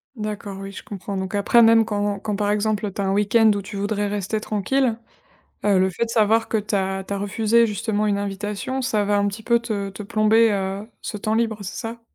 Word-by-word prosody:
D'accord, 210 -3 -5
oui, 195 0 -7
je 195 - -8
comprends. 200 0 -6
Donc 190 +1 -3
après, 205 +4 +4
même 225 0 +6
quand 205 -2 -2
quand 205 0 -3
par 205 0 0
exemple, 210 0 0
tu 200 - -3
as - - 0
un 190 - +1
week-end 215 +2 +4
où 200 - -2
tu 200 +2 -9
voudrais 205 +1 -1
rester 205 +1 -2
tranquille, 225 +4 0 0.7
heu, 200 -2 +4
le 190 0 +2
fait 230 +6 -2
de - - -12
savoir 225 0 +3
que 225 - 0
tu 210 0 -2
as 190 0 -1
tu - - -5
as 200 - -1
refusé 220 +3 +2
justement 210 0 -1
une 205 - +1
invitation, 205 +6 -3
ça 220 -5 0
va 205 0 +2
un 200 0 +2
petit 205 +3 -7
peu 235 +1 +3
te 205 -4 -3
te 195 +2 -8
plomber, 215 +2 +3
heu, 195 0 -2 0.2
ce 210 - -5
temps 215 +2 -1
libre, 225 -1 0
c'est 195 - -6
ça? 230 +1 -6
210 Hz, 235 wpm, -22 LUFS, 200-220 Hz, 0.7 s, même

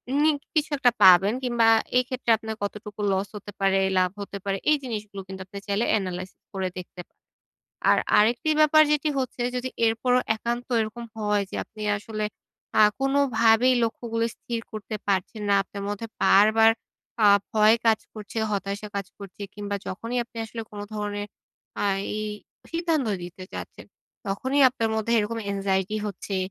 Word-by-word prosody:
unique 295 -1 +2
কিছু 305 0 +2
একটা 250 -3 +4
পাবেন 190 +3 +7
কিংবা 235 -2 +2 0.3
এক্ষেত্রে 250 -2 -1
আপনার 220 0 -6
কতটুকু 210 0 -5
লস 190 +1 0
হতে 205 0 -8
পারে, 195 0 +3 0.2
লাভ 185 -1 +3
হতে 200 0 -6
পারে, 195 -1 0
এই 305 - +5
জিনিসগুলো 210 -5 -5
কিন্তু 190 0 -8
আপনি 195 +2 -10
চাইলে 205 +3 +1
analysis 185 0 -6
করে 190 -1 -1
দেখতে 180 0 -8
পারেন। - - -49 0.7
আর - - +5 0.2
আরেকটি 235 +8 +3
ব্যাপার 310 0 +7
যেটি 300 +1 +1
হচ্ছে, 255 -1 -2
যদি 255 +1 -2 0.2
এরপরও 245 +3 +2 0.2
একান্ত 240 +2 -3
এরকম 220 +2 -4
হয় 210 -2 +1
যে, - - -5
আপনি 215 -1 -11
আসলে 215 +1 -4 0.6
আ - - +9 0.2
কোনোভাবেই 255 -3 +4
লক্ষ্যগুলি 230 0 -2
স্থির 235 -1 -4
করতে 215 0 -5
পারছেন 200 +2 -1
না, 200 - +4
আপনার 200 +1 -8
মধ্যে 205 +2 -4 0.2
বারবার 220 +3 +6 0.5
আ - - +8 0.3
ভয় 215 +1 +6
কাজ 220 -1 +5 0.2
করছে, 215 +1 -6
হতাশা 200 +1 -3
কাজ 195 -2 -3
করছে 200 0 -10
কিংবা 205 -1 -3
যখনই 230 +6 -3
আপনি 235 - -22
আসলে 225 +1 -6
কোনো 205 -1 -6
ধরনের 205 -1 -3 0.6
আ - - +1 0.3
এই 215 - -2 0.5
সিদ্ধান্ত 330 -6 0 0.2
দিতে 180 +1 -8
চাচ্ছেন, - - -8 0.4
তখনই 260 +8 0
আপনার 230 -3 -2
মধ্যে 220 +1 -1
এরকম 215 +2 -1
anxiety 195 +1 0
হচ্ছে। 195 0 -5
215 Hz, 160 wpm, -25 LUFS, 200-240 Hz, 0.7 s, আ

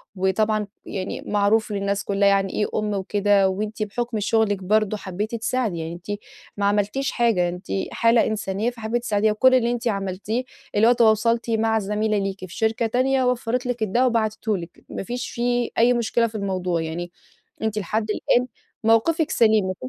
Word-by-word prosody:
وطبعًا 210 +3 +1 0.2
يعني 190 -1 -4
معروف 210 +2 +2
للناس 200 0 -1
كلّها 200 0 +2
يعني 195 -1 +2
إيه 210 - +1
أم 210 -1 -1
وكده. 200 0 +2
وأنتِ 210 +3 -3
بحُكم 230 +2 -3
شُغلِك 205 -2 +1
برضه 215 +2 +1
حبّيتِ 205 +4 -4
تساعدي. 230 -4 -1
يعني 165 +1 -4
أنتِ 200 +4 -6 0.4
ما 200 - 0
عملتيش 210 +7 0
حاجة، 220 -8 +2
أنتِ 180 +1 -8 0.3
حالة 230 0 +3
إنسانية 215 0 -1
فحبّيتِ 235 0 -3
تساعديها. 215 -1 +1
وكل 260 +4 +4
اللي 240 -1 +2
أنتِ 240 0 -2
عملتيه 200 +4 -2 0.3
اللي 220 +2 +5
هو - - +7
تواصلتِ 230 0 +3
مع 225 0 +2
زميلة 210 +1 0
ليكِ 195 -1 -2
في 175 - -11
شركة 225 +1 +1
تانية، 260 +3 +1
وفَّرت 250 0 0
لِك 245 -2 -2
الدّوا، 235 +5 +2
وبعتته 220 -3 0
لِك، 170 -1 -10
ما - - -5
فيش 245 +4 -4
فيه 240 0 0
أي 240 +2 +5
مشكلة 235 0 +1
في 220 - -12
الموضوع. 185 -4 -1
يعني 170 +2 -5 0.5
أنتِ 215 -1 -1
لحد 215 +3 -1
الآن، 245 +3 +1 0.4
مَوقِفِك 295 +9 +3
سَليم، 220 -3 +4
ما 185 - -2
ي 130 - -4
215 Hz, 175 wpm, -23 LUFS, 200-230 Hz, 0.5 s, هو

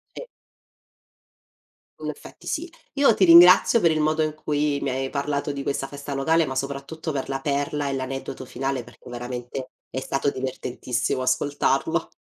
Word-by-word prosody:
Sì. - - -6 1.8
In - - -4
effetti, - - -10
sì. 335 +3 -2 0.2
Io 280 -4 +5
ti 195 - +2
ringrazio, 180 +6 +8
per 170 -5 +4
il 155 - 0
modo 155 +1 +2
in 155 -1 -1
cui 150 -1 -1
mi 140 - -1
hai 135 +1 -2
parlato 145 0 -1
di 140 -1 -5
questa 135 -1 -2
festa 140 0 -7
locale, 160 +4 +2
ma 130 - -5
soprattutto, 140 +4 -4
per 135 -2 -3
la 135 0 -2
perla 145 +1 -1
e 140 - -1
l'aneddoto 135 0 -5
finale, 135 0 -3
perché, 120 +1 -15
veramente, 125 +1 -6 0.2
è 130 - -3
stato 135 +1 -1
divertentissimo 130 -1 -3
ascoltarlo. 145 +4 0
140 Hz, 160 wpm, -24 LUFS, 130-155 Hz, 1.8 s, ringrazio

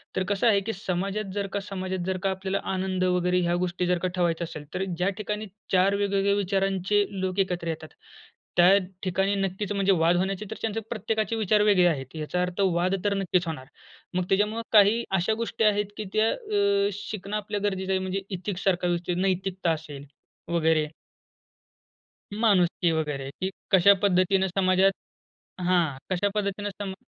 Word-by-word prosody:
तर 185 - +1
कसं 205 +3 +2
आहे 205 -3 +5
की 225 +3 -3
समाजात 195 +1 -3
जर 200 -1 -1
का 200 - 0
समाजात 190 -2 -4
जर 190 0 0
का 195 - +2
आपल्याला 190 +1 -2
आनंद 185 0 -1
वगैरे 180 0 +2
ह्या 175 0 +1
गोष्टी 180 0 -1
जर 180 - +2
का 185 - -1
ठेवायच्या 170 -1 0
असेल, 155 -2 -9
तर 185 - -1
ज्या 180 +3 +1
ठिकाणी 210 0 -4 0.2
चार 190 +2 +4
वेगवेगळ्या 200 0 +1
विचारांचे 195 +1 +1 0.2
लोक 185 +1 -2
एकत्र 180 -3 -1
येतात. 155 -1 -4 0.7
त्या 180 +3 +7 0.3
ठिकाणी 195 +2 +1
नक्कीच, 195 +1 -2
म्हणजे 195 0 +2
वाद 170 +2 +4
होण्याचे 195 +2 -1
तर - - -4
चान्स 225 -1 -2
आहे, 225 - -4
प्रत्येकाचे 220 0 -1
विचार 215 -1 +2
वेगळे 200 -4 +5
आहेत. 135 -2 -2
याचा 155 +3 -2
अर्थ 180 +2 -2
वाद 185 +1 +2
तर 205 - +2
नक्कीच 180 -2 0
होणार. 140 -5 -5 0.5
मग 180 0 0
त्याच्यामुळं 210 +3 +1
काही 215 +3 +6
अशा 185 +5 +1
गोष्टी 230 0 -2
आहेत 205 -1 +2
की 215 - -4
त्या 215 +1 +3 0.6
अ, - - 0
शिकणं 205 0 -6
आपल्या 210 0 -3
गरजेचं 190 -2 -1
आहे. 190 - +2
म्हणजे 190 +1 -2
एथिक 190 0 -4
सारखं 180 -2 +1
विषय 175 +1 -1
नैतिकता 190 -2 0
असेल 150 -3 -6 0.4
वगैरे 160 -2 +2 1.5
माणुसकी 185 -6 +2
वगैरे 150 -4 -2
की 190 - 0 0.2
कशा 195 +1 +7
पद्धतीनं 190 0 +3
समाजात 190 +1 +3 0.7
हां, 170 -7 +2
कशा 185 +2 +1
पद्धतीने 205 0 -2
सम 195 -1 -6
190 Hz, 170 wpm, -26 LUFS, 180-200 Hz, 1.5 s, त्या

